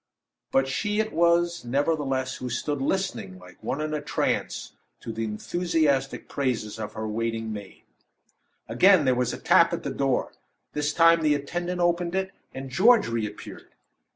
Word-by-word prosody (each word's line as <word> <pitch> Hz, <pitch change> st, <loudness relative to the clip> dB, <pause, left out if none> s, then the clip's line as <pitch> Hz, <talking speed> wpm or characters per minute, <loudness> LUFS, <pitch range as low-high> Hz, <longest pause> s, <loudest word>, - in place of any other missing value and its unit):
But 135 Hz, 0 st, +3 dB
she 205 Hz, +10 st, -1 dB
it 220 Hz, 0 st, -1 dB
was, 170 Hz, +1 st, +2 dB
nevertheless, 135 Hz, 0 st, -1 dB
who 125 Hz, -, -5 dB
stood 145 Hz, +3 st, -2 dB
listening 135 Hz, -, -2 dB
like 90 Hz, -1 st, -16 dB
one 135 Hz, -, -3 dB
in 155 Hz, 0 st, -2 dB
a 150 Hz, -, -2 dB
trance, 145 Hz, -, -2 dB, 0.3 s
to 115 Hz, -, -6 dB
the 115 Hz, 0 st, -2 dB
enthusiastic 145 Hz, +4 st, 0 dB
praises 120 Hz, -6 st, -2 dB
of 105 Hz, -1 st, -5 dB
her 110 Hz, 0 st, -4 dB
waiting 115 Hz, 0 st, -2 dB
maid. 100 Hz, -2 st, -10 dB, 0.8 s
Again 190 Hz, -5 st, +5 dB
there 130 Hz, -, +4 dB
was 125 Hz, -1 st, 0 dB
a -, -, -5 dB
tap -, -, +4 dB
at -, -, -3 dB
the -, -, -3 dB
door. -, -, 0 dB, 0.4 s
This 150 Hz, 0 st, 0 dB
time 165 Hz, +1 st, +5 dB
the 150 Hz, -2 st, +3 dB
attendant 175 Hz, +5 st, -3 dB
opened 175 Hz, 0 st, +1 dB
it, 190 Hz, 0 st, -1 dB, 0.2 s
and 135 Hz, 0 st, -7 dB
George 215 Hz, -, +5 dB
reappeared. 110 Hz, -3 st, -5 dB
145 Hz, 160 wpm, -26 LUFS, 115-170 Hz, 0.8 s, Again